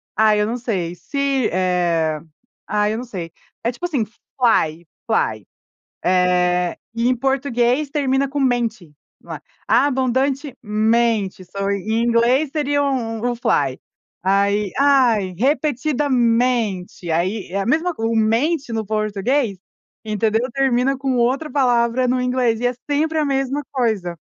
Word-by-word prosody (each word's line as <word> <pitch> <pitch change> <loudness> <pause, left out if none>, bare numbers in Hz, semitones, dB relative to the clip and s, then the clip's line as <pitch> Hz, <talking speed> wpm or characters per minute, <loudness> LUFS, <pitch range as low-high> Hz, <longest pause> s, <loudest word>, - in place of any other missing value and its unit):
ai, 215 -1 +4
eu 210 - +1
não 235 +2 -2
sei. 190 -8 -3
Se, 275 - -1
eh 175 -4 +1 0.5
ai, 210 0 +1
eu - - -3
não 240 - -4
sei. 180 -8 -6 0.3
É 235 - +1
tipo, 300 +8 -6
assim, 285 -10 0
fly, 210 -8 -1 0.2
fly. - - 0 0.6
Eh, 180 -1 +2 0.2
e 230 +1 +1
em 255 - +3
português 265 +1 0
termina 275 -2 +1
com 285 +1 -3
mente, 240 - 0 0.3
lá. - - -8 0.3
Abundantemente, 235 -6 +1
só 195 +2 -3
em 215 +3 -1
inglês 240 +5 +2
seria 290 -2 0
um 235 -5 -2
um - - -2
fly. 140 - 0 0.4
Aí, 200 +2 +1
ai, 245 -9 +3
repetidamente. 245 - 0
Aí, 185 +6 -1
é 200 - -1
a 195 - -2
mesma 325 +7 +1
co 225 - -5
o 225 0 0
mente, 240 +6 +1
no 220 -1 -2
português, 215 +2 0 0.5
entendeu, 220 +3 0
termina 270 0 +1
com 265 -1 -1
outra 260 +6 +1
palavra 250 -2 +2
no 255 +1 +1
inglês 250 -3 +1
e 245 - +1
é 245 - 0 0.2
sempre 315 +2 +1
a 305 - +2
mesma 270 +1 -1
coisa. 215 -10 -1
235 Hz, 140 wpm, -20 LUFS, 205-270 Hz, 0.6 s, ai